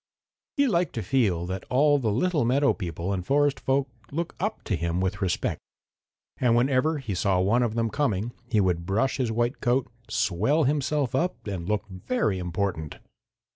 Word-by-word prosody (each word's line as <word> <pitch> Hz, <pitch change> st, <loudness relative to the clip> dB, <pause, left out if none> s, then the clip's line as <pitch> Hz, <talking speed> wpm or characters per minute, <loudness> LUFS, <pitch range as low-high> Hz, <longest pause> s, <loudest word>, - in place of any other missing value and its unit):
He 285 Hz, -, +4 dB
liked 180 Hz, -8 st, +1 dB
to 115 Hz, -, -2 dB
feel 90 Hz, -6 st, +1 dB
that 95 Hz, +1 st, -4 dB
all 145 Hz, +3 st, +4 dB
the 115 Hz, -5 st, 0 dB
little 155 Hz, -, +1 dB
meadow 140 Hz, +4 st, +3 dB
people 90 Hz, -1 st, -4 dB
and 90 Hz, -2 st, -2 dB
forest 145 Hz, +5 st, +2 dB
folks 135 Hz, 0 st, 0 dB, 0.2 s
looked 170 Hz, +4 st, -3 dB
up 215 Hz, +3 st, -2 dB
to 100 Hz, -, -1 dB
him 85 Hz, +1 st, -1 dB
with 95 Hz, +2 st, -1 dB
respect, 95 Hz, -2 st, -1 dB, 0.8 s
and 120 Hz, -2 st, +3 dB
whenever 130 Hz, +5 st, +2 dB
he 125 Hz, -8 st, -4 dB
saw 95 Hz, 0 st, +1 dB
one 105 Hz, +7 st, +3 dB
of 115 Hz, -2 st, 0 dB
them 115 Hz, -1 st, 0 dB
coming 120 Hz, -6 st, 0 dB, 0.2 s
he 110 Hz, -, +2 dB
would 90 Hz, -3 st, +1 dB
brush 115 Hz, +7 st, +1 dB
his 125 Hz, -4 st, 0 dB
white 120 Hz, +4 st, -1 dB
coat, 125 Hz, +2 st, +1 dB, 0.2 s
swell 120 Hz, -, +1 dB
himself 145 Hz, -2 st, 0 dB
up 175 Hz, +7 st, -1 dB
and 95 Hz, -3 st, -4 dB
look 105 Hz, 0 st, -1 dB
very 95 Hz, -, -1 dB
important. 90 Hz, -3 st, -2 dB
115 Hz, 175 wpm, -26 LUFS, 95-140 Hz, 0.8 s, He